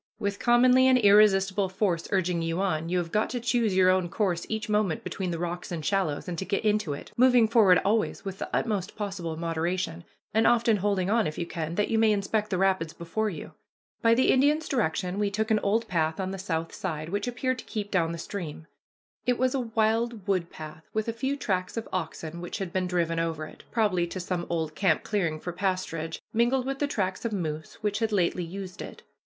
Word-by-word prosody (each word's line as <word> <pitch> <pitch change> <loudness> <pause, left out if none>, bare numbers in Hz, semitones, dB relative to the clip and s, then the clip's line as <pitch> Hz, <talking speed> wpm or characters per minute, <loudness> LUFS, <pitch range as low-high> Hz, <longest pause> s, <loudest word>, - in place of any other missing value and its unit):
With 200 -2 -2
commonly 250 +2 +5
an 260 -1 +6
irresistible 200 -3 +4
force 185 -3 -1
urging 180 -3 +1
you 165 +1 -1
on, 165 -4 -1
you 180 - +1
have 170 -2 -2
got 215 0 +1
to 245 - -2
choose 235 -4 +1
your 185 0 +5
own 185 -2 +1
course 180 -3 -1
each 220 -1 -2
moment 210 -6 0
between 190 -2 -3
the 170 - -2
rocks 175 +1 -4
and 160 -3 -4
shallows, 190 -8 0
and 175 -2 -3
to - - -2
get 200 +3 -2
into 210 -7 +1
it, 140 - -9
moving 245 -2 +6
forward 215 -6 +5
always 215 +1 0
with 195 -1 -5
the - - -4
utmost 210 -4 -1
possible 190 -6 -4
moderation, 170 +1 -2 0.3
and 220 +1 +4
often 235 -2 +4
holding 195 -1 0
on, 225 -1 +3
if 155 - -5
you 170 - -2
can, 165 -1 -4
that 210 - +1
you 225 - +2
may 220 -1 +5
inspect 210 +1 0
the 185 - 0
rapids 190 -4 +1
before 210 +6 -2
you. 180 - -8 0.5
By 230 -1 +5
the 260 - +4
Indian's 295 +4 +3
direction 185 - -1
we 205 -1 +1
took 215 +2 -1
an 215 - +4
old 225 +3 0
path 160 -1 0
on 190 0 -2
the 195 - -5
south 165 -3 -3
side, 160 -4 -4
which 205 +4 -2
appeared 255 +1 -1
to - - -9
keep 205 -3 -4
down 165 -4 +2
the 170 - -4
stream. 160 -3 -6 0.6
It 245 -1 +3
was 255 0 +1
a 270 - 0
wild 225 -2 0
wood 185 -4 0
path, 155 0 -10
with 220 +1 0
a - - -1
few 265 +5 -2
tracks 185 -5 -2
of 230 - -3
oxen 165 -1 -4
which 175 - -5
had 190 -3 -5
been 185 -1 0
driven 170 -2 0
over 165 -2 -2
it, - - -14
probably 200 -7 +1
to 185 - -6
some 180 -1 -3
old 160 -2 -1
camp 165 -1 +2
clearing 170 -7 -1
for 175 - -5
pasturage, 175 -4 -2 0.2
mingled 240 +3 +2
with 270 0 -3
the 290 - +1
tracks 190 -7 -2
of 230 - -1
moose 160 -6 -4
which 210 0 -1
had 225 -1 0
lately 180 -2 +1
used 185 +2 -7
it. - - -9
195 Hz, 220 wpm, -27 LUFS, 170-220 Hz, 0.6 s, an